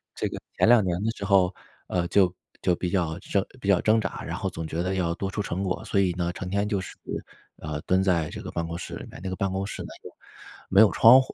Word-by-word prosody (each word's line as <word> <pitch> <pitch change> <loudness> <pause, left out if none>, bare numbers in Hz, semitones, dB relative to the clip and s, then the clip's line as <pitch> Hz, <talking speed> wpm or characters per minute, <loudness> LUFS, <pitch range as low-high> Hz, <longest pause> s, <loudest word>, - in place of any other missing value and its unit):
这 - - -1
个 - - -6 0.2
前 - - +4
2 120 -2 +7
年 90 -2 0
的 115 - +1
时 100 - -4
候， 95 -2 +4 0.3
呃， 85 -1 0
就 95 -2 +4 0.3
就 90 - +2
比 90 +1 -2
较 85 -4 0
挣 100 0 0
比 100 - -6
较 100 -3 +5
挣 110 +1 +4
扎， 95 - -4
然 - - -4
后 - - -2
总 80 - -5
觉 80 +2 -2
得 95 +1 -1
要 85 -3 0
多 95 +2 -3
出 105 - -3
成 95 -1 -2
果， 95 -1 -2
所 100 - +1
以 95 -2 +3
呢， 85 -1 -1
成 90 +1 -5
天 100 +2 0
就 105 -2 0
是， 90 - -9 0.6
呃， 75 -1 -4
蹲 95 +4 +2
在 85 -5 +2
这 - - -7
个 - - -7
办 85 - -2
公 85 0 -5
室 85 - -6
里 - - -7
面， - - -10
那 95 - -3
个 95 - -3
办 95 0 -1
公 95 +1 -2
室 100 - -6
呢 - - -7 0.2
又 - - -9 0.6
没 95 - +6
有 110 - +7
窗 125 +4 +8
户。 130 - -8
95 Hz, 290 characters per minute, -26 LUFS, 85-100 Hz, 0.6 s, 窗